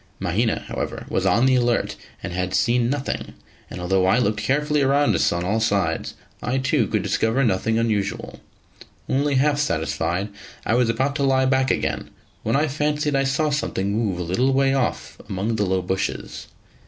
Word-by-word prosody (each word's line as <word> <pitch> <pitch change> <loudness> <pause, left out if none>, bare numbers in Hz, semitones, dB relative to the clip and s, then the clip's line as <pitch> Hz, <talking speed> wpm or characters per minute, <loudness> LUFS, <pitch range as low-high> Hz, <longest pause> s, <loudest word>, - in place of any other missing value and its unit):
Mahina, - - 0
however, - - -4
was - - 0
on 120 - +3
the 130 - +4
alert, 120 -2 +1 0.3
and - - -4
had 90 +1 -1
seen 120 0 +2
nothing; 140 0 -3 0.3
and - - -7
although 95 +1 +1
I 95 - +4
looked 110 -3 +1
carefully 150 +5 +1
round 140 -3 +3
us 85 - +2
on 85 0 -1
all 105 +5 0
sides, 100 -7 0 0.3
I 125 +3 -1
too 135 -3 +1
could - - -1
discover 115 +5 +1
nothing 110 0 +1
unusual. 105 -3 -1 0.7
Only 140 +1 +1
half 145 +2 +2
satisfied, 100 -9 -1 0.4
I - - +1
was 120 -1 +3
about 135 +5 0
to 140 - 0
lie 130 -1 +3
back 130 0 +2
again, - - -1 0.3
when 115 +2 0
I 150 +3 +2
fancied 150 +1 0
I 135 0 +2
saw 145 +3 +1
something 100 -9 -1
move 105 -4 0
a 90 - -3
little 120 +11 +1
way 135 0 +3
off 135 -3 -2
among 100 +4 -1
the 105 -2 +1
low 95 0 0
bushes. 95 +2 -3
120 Hz, 180 wpm, -23 LUFS, 100-135 Hz, 0.7 s, the